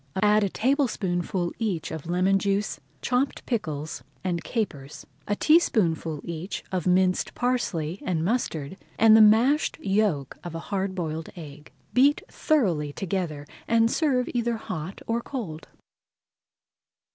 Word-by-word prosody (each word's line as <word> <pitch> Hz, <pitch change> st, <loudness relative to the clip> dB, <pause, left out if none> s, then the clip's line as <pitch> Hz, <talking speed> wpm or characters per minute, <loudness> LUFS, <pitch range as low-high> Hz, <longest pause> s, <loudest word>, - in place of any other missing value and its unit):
Add 210 Hz, +1 st, +4 dB
a 200 Hz, -, +1 dB
tablespoonful 190 Hz, -, 0 dB
each 200 Hz, -8 st, -2 dB
of 160 Hz, 0 st, -6 dB
lemon 185 Hz, +3 st, +2 dB
juice 200 Hz, +1 st, -1 dB, 0.2 s
chopped 255 Hz, +2 st, 0 dB
pickles, 155 Hz, -, -3 dB, 0.2 s
and 175 Hz, -3 st, -1 dB
capers, 150 Hz, -, -4 dB, 0.2 s
a 205 Hz, -, +1 dB
teaspoonful 175 Hz, -, +2 dB
each 170 Hz, +3 st, -5 dB
of 185 Hz, -2 st, -1 dB
minced 185 Hz, 0 st, +2 dB
parsley 200 Hz, -9 st, -1 dB
and 165 Hz, -3 st, -1 dB
mustard, 185 Hz, -, -2 dB, 0.2 s
and 220 Hz, 0 st, +7 dB
the 220 Hz, -, +8 dB
mashed 235 Hz, +8 st, +4 dB
yolk 195 Hz, -, 0 dB
of 175 Hz, -2 st, -6 dB
a -, -, -3 dB
hard 190 Hz, -1 st, -1 dB
boiled 160 Hz, -3 st, -3 dB
egg. 150 Hz, -3 st, -11 dB, 0.2 s
Beat 280 Hz, +3 st, +4 dB
thoroughly 180 Hz, -, +1 dB
together 165 Hz, -4 st, -3 dB, 0.2 s
and 230 Hz, 0 st, +3 dB
serve 260 Hz, -6 st, +1 dB
either 235 Hz, -1 st, 0 dB
hot 180 Hz, -3 st, -6 dB
or 230 Hz, +1 st, -1 dB
cold. 195 Hz, -, -6 dB
190 Hz, 130 wpm, -26 LUFS, 165-230 Hz, 0.2 s, the